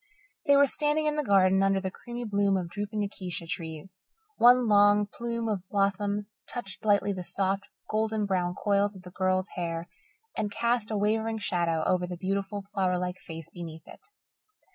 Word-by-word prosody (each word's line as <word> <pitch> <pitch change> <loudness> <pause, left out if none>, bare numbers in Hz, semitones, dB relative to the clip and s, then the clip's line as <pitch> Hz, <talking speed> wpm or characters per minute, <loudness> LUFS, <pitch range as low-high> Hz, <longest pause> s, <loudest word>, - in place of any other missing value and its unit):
They 285 - +7
were 285 - +7
standing 295 +2 +2
in 300 0 +1
the 300 - 0
garden 190 -4 +4
under 195 0 +3
the 190 -1 -3
creamy 240 +4 -7
bloom 200 -3 +2
of 175 -2 -4
drooping 205 +3 -3
acacia 185 -4 -5
trees. 170 +1 -7 0.3
One 245 0 +6
long 205 0 +5
plume 235 +2 -4
of 195 -4 -2
blossoms 200 +1 0 0.2
touched 195 -9 -6
lightly 205 -1 +3
the 185 -1 -5
soft, 195 +2 -1 0.2
golden 215 0 0
brown 180 -2 0
coils 205 0 +1
of 185 - -12
the 180 - -11
girl's 185 +1 0
hair 170 -2 -4 0.5
and 210 - -1
cast 235 +1 0
a 215 - -1
wavering 220 +2 +1
shadow 170 -5 0
over 180 -1 +1
the 180 0 -6
beautiful, 195 +2 -2
flower 185 -2 +1
like 180 +1 -3
face 165 -2 -9
beneath 165 -2 -9
it. - - -13
200 Hz, 175 wpm, -28 LUFS, 185-215 Hz, 0.5 s, They